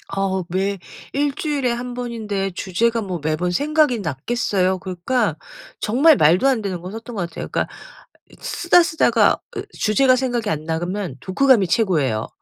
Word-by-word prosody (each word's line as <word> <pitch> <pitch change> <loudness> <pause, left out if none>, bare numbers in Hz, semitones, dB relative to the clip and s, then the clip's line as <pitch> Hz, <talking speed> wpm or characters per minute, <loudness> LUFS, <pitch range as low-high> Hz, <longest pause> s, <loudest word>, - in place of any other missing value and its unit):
어 190 -1 0
매 195 +2 -1 0.3
1 285 0 0
주일에 285 -6 -1
1 245 +1 -4
번인데 220 -5 -3
주제가 225 +6 0
뭐 185 -4 -4
매번 160 +3 0
생각이 295 - +2
났겠어요? 185 - -1
그러니까 190 - -1 0.4
정말 280 +8 +4
말도 175 - +4
안 255 -5 +2
되는 185 -4 -4
거 180 - -7
썼던 225 +1 -8
것 175 -3 -3
같아요. - - -7
그러니까 - - -1 0.6
있 - - -20
쓰다 350 0 +3
쓰다가 320 0 +3 0.2
으 - - -3
주제가 255 +4 +3
생각이 245 -4 -1
안 155 -2 -3
나. 160 0 -1
그러면 180 -4 -4
독후감이 225 -1 +3
최고예요. 155 - +1
210 Hz, 335 characters per minute, -21 LUFS, 180-250 Hz, 0.6 s, 정말